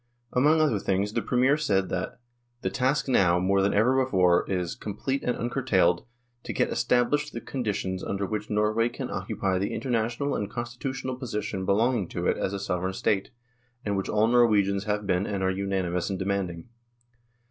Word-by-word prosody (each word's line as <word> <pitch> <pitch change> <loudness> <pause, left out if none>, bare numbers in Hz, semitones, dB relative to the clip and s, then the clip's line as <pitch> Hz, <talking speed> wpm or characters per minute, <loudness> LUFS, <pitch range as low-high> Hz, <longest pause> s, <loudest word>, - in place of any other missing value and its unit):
Among 150 +5 +4
other 145 -10 +2
things 100 +2 0
the 115 - 0
Premier 130 +5 +2
said 100 -11 +1
that 90 - -3 0.2
" 120 0 -45
the - - -1
task 135 +3 +1
now, 90 -9 +4
more 95 +2 +2
than 100 - +2
ever 130 +6 +4
before, 90 -8 +3
is, 90 -3 -1
complete 130 +7 -3
and 125 - -1
uncurtailed, 115 -9 +1 0.3
to - - -5
get - - +1
established 125 +5 +1
the 115 - -4
conditions 105 -8 -3
under 100 0 -2
which 105 +1 -4
Norway 110 +2 +2
can - - -6
occupy 95 -1 -1
the 100 - -2
international 120 +2 -1
and 100 - -2
constitutional 125 +2 -4
position 105 -6 -3
belonging 110 0 +2
to - - -4
it - - +2
as - - -1
a 100 - -3
Sovereign 95 -1 -2
State, 95 0 0 0.6
and 100 -1 0
which 95 - -2
all 105 +1 +3
Norwegians 105 -5 +3
have 105 -1 -1
been 90 0 +1
and 100 -2 -2
are 95 - +2
unanimous 95 -2 -1
in 95 - -2
demanding." 95 -1 -3
105 Hz, 180 wpm, -27 LUFS, 95-125 Hz, 0.6 s, Among